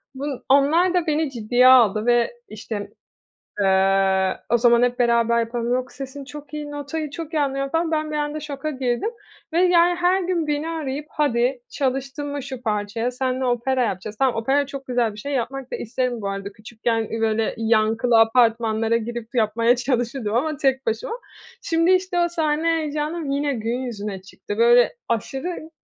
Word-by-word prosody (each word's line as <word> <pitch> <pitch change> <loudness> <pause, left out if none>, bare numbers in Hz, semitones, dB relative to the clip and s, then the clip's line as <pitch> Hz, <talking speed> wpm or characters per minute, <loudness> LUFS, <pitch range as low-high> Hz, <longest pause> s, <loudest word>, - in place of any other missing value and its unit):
Bun 275 -1 -5
onlar 315 +7 +4
da 355 -2 +1
beni 305 -2 0
ciddiye 245 +2 +3
aldı 225 -4 +6
ve 240 -1 +3 0.2
işte, 215 -1 -6 0.7
eee, 190 -1 +3
o 240 - +5
zaman 235 0 +4
"Hep 245 0 +1
beraber 235 -1 +3
yapalım.", 235 +1 -1
yok, 255 0 -3
"Sesin 275 +1 -8
çok 295 +2 -10
iyi.", 295 -1 -5
notayı 290 +1 -4
çok 325 +2 -7
iyi 305 - +2
anlıyorum 275 -1 -1
falan. 325 +2 0
Ben 310 0 -1
bir 305 - -2
anda 295 +1 -2
şoka 295 0 -5
girdim 260 - -1 0.4
ve, 335 - +2
yani, 355 -1 +4
her 365 +2 +3
gün 350 -3 -1
beni 295 +2 -1
arayıp 300 -3 -4
"Hadi, 255 -3 0
çalıştın 270 +1 -2
mı 285 -1 -4
şu 260 -2 -7
parçaya, 215 +2 -1
senle 255 +1 -2
opera 250 +1 +1
yapacağız." 210 0 -4
Tamam, 265 -2 +2
opera 270 +5 +1
çok 275 -1 -8
güzel 240 -3 0
bir 210 - -12
şey, 280 +6 -5
yapmak 265 0 -3
da - - -1
isterim 245 0 -2
bu 200 - -3
arada 195 0 -5
küçükken, 225 +1 -2
iii, 225 - -3
böyle 220 0 0
yankılı 225 +1 +3
apartmanlara 225 -1 +3
girip 235 +1 -5
yapmaya 230 +1 +2
çalışırdım 245 -3 -1
ama 300 +5 0
tek 265 -2 0
başıma. 225 - -2 0.5
Şimdi, 330 +1 +2
işte, 370 -1 +1
o 345 - +2
sahne 320 -2 -1
heyecanım 305 0 -3
yine 285 +1 0
gün 230 +2 -2
yüzüne 210 -6 -5
çıktı. 205 +2 -8
Böyle, 240 +1 +5 0.2
aşırı, 270 - -3
255 Hz, 175 wpm, -22 LUFS, 230-295 Hz, 0.7 s, aldı